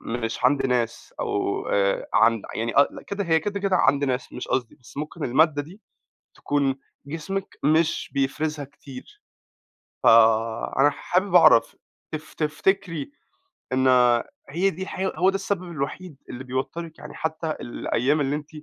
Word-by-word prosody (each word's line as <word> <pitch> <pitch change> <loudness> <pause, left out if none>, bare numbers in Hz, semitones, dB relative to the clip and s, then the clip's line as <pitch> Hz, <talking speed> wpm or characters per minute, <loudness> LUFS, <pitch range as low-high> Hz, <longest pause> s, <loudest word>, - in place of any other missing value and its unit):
مش 115 0 -4
عَند 135 +2 +3
ناس 120 -3 -2
أو - - -1
آآ 100 -1 +1
عند 115 -1 +4
يعني 115 +1 -2
ق 140 - +3
كده 200 0 -3
هي 160 -2 +3
كده 200 +4 -3
كده 195 -1 +2
عند 140 -3 +3
ناس، 130 -1 -2
مش 125 - -7
قصدي 125 -3 -1
بس 125 - -18
ممكن 150 +2 -5
المادّة 145 +3 +3
دي 175 +8 -14 0.6
تكون 140 -2 0 0.3
جسمِك 165 +6 -5
مش 155 +2 +2
بيفرِزها 145 +2 -1
كتير. 140 - -13 0.8
فأنا 115 +4 +4
حابب 180 +6 -1
أعرف 165 -9 +6 0.4
تف 155 0 -7
تفتكري 170 - -1 0.6
إن 130 0 +2 0.6
هي 175 +7 +1
دي 190 0 -8
الحقي 190 0 -3
هو 185 +1 +3
ده 195 - -1
السبب 195 -1 -2
الوحيد 170 0 -5
اللي 125 +1 -7
بيوتّرِك 145 +6 -5
يعني 150 0 -10
حتى 160 +1 -3
الأيام 130 +4 0
اللي 140 +1 0
أنتِ 150 0 -7
145 Hz, 145 wpm, -24 LUFS, 130-170 Hz, 0.8 s, أعرف